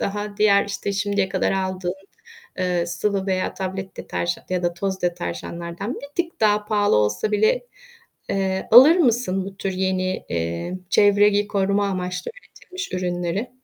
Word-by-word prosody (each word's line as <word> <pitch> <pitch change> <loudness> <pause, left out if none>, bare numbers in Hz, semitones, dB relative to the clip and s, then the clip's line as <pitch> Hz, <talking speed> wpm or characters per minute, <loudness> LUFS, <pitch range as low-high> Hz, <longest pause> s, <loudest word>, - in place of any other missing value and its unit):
daha 205 +1 -3
diğer 200 -1 +4
işte 200 0 -4
şimdiye 200 -1 0
kadar - - 0
aldığın, 185 -1 -2 0.7
ııı, 180 -2 0
sıvı 195 +3 -1
veya 185 -1 -1
tablet 190 0 -5
deterjan 85 0 -3
ya 180 -1 0
da 175 0 0
toz 190 +1 -3
deterjanlardan 170 - -4
bir 280 - -9 0.2
tık 335 - -21
daha 210 -1 +3
pahalı 205 - +2
olsa 105 - +1
bile, 215 - +2 0.6
eee, 190 -1 -1
alır 265 +9 +9
mısın 235 - +1
bu 195 0 -9
tür 195 0 -3
yeni, 185 0 -1
eee, 85 - -3
çevreyi 205 0 +4
koruma 200 0 +1
amaçlı 180 -1 -3
üretilmiş 375 -6 -9
ürünleri? 180 +5 -2
195 Hz, 145 wpm, -22 LUFS, 180-205 Hz, 0.7 s, alır